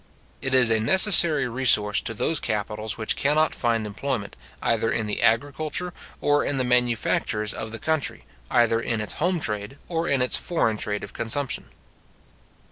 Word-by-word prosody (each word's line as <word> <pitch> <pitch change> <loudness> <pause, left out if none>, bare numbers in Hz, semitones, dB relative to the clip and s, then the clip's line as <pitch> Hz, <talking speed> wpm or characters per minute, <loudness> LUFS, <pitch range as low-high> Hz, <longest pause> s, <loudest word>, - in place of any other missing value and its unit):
It 135 0 -1
is 125 -3 +5
a 110 - +2
necessary 170 - +6
resource 115 -4 +3
to 115 - -5
those 160 +9 0
capitals 105 0 -4
which 110 -1 -1
cannot 155 +3 +1
find 115 -2 -1
employment, 105 0 -5 0.2
either 115 -1 -1
in 115 - -2
the 105 - -4
agriculture 145 +9 -1 0.3
or 145 0 +1
in 145 - -2
the 130 - 0
manufactures 120 -3 0
of 110 - -7
the 115 - -6
country, 155 +3 -3 0.2
either 115 -1 +2
in 115 -1 -3
its 105 - -3
home 175 +1 0
trade, 105 +1 -3
or 165 0 -3
in 135 -2 +1
its 125 - +3
foreign 115 -11 -1
trade 105 0 -3
of 100 - -9
consumption. 125 +4 -1
120 Hz, 165 wpm, -23 LUFS, 110-145 Hz, 0.3 s, necessary